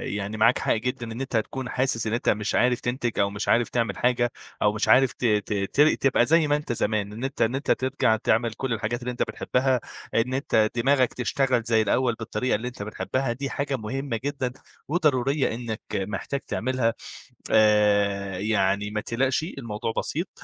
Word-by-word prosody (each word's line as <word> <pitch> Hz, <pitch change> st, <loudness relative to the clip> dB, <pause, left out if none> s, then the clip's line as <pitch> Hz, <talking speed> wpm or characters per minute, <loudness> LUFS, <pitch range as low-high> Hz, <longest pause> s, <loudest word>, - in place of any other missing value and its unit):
يعني 105 Hz, +1 st, -4 dB
معاك 115 Hz, +3 st, +4 dB
حق -, -, +1 dB
جدًا 125 Hz, +2 st, -2 dB
إن 115 Hz, +3 st, -5 dB
أنت 130 Hz, -3 st, -1 dB
تكُون 125 Hz, +3 st, -3 dB
حاسس 125 Hz, -3 st, 0 dB
إن 110 Hz, -, -1 dB
أنت 120 Hz, -, 0 dB
مش 105 Hz, 0 st, 0 dB
عارف 125 Hz, 0 st, +3 dB
تنتِج 120 Hz, -1 st, -2 dB
أو 100 Hz, -, +3 dB
مش 100 Hz, 0 st, -5 dB
عارف 120 Hz, 0 st, +3 dB
تعمِل 115 Hz, -2 st, -1 dB
حاجة 120 Hz, 0 st, +1 dB, 0.3 s
أو 105 Hz, -, +3 dB
مش 110 Hz, -, -1 dB
عارف 130 Hz, -3 st, +5 dB
ت -, -, -4 dB
ت 105 Hz, -2 st, +1 dB, 0.2 s
تر 150 Hz, +2 st, +6 dB
تبقى 130 Hz, -3 st, +2 dB
زي 160 Hz, +2 st, +4 dB
ما 145 Hz, -, +3 dB
أنت 150 Hz, -4 st, -3 dB
زمان، 105 Hz, -2 st, -1 dB
إن 115 Hz, +4 st, -7 dB
أنت 135 Hz, 0 st, -3 dB
إن 115 Hz, +3 st, +2 dB
أنت 140 Hz, -, -1 dB
ترجَع 130 Hz, -3 st, +2 dB
تعمل 115 Hz, +1 st, +1 dB
كلّ 130 Hz, +1 st, -3 dB
الحاجات 115 Hz, +1 st, -2 dB
اللي 125 Hz, +1 st, -3 dB
أنت 125 Hz, -, -6 dB
بتحبّها 130 Hz, 0 st, 0 dB, 0.4 s
إن 120 Hz, +3 st, +1 dB
أنت 110 Hz, -5 st, +2 dB
دماغك 130 Hz, 0 st, +2 dB
تشتغل 125 Hz, -1 st, 0 dB
زي 115 Hz, -1 st, +2 dB
الأول 125 Hz, +3 st, +1 dB
بالطريقة 120 Hz, +3 st, -1 dB
اللي 115 Hz, +4 st, -3 dB
أنت 120 Hz, -4 st, -6 dB
بتحبّها، 125 Hz, +4 st, -2 dB
دي 135 Hz, +3 st, -4 dB
حاجة 140 Hz, -1 st, -2 dB
مهمة 120 Hz, +2 st, -3 dB
جدًا 140 Hz, -3 st, -2 dB, 0.4 s
وضرورية 145 Hz, -5 st, +1 dB
إنك 115 Hz, -2 st, -5 dB
محتاج 100 Hz, +8 st, -2 dB
تعملها 125 Hz, -1 st, 0 dB, 0.6 s
آآ، 100 Hz, -3 st, +3 dB
يعني 105 Hz, -1 st, +1 dB
ما 105 Hz, 0 st, -2 dB
تقلَقش 130 Hz, +5 st, 0 dB
الموضوع 115 Hz, -, -4 dB
بسيط 170 Hz, +5 st, -2 dB
120 Hz, 190 wpm, -25 LUFS, 110-130 Hz, 0.6 s, تر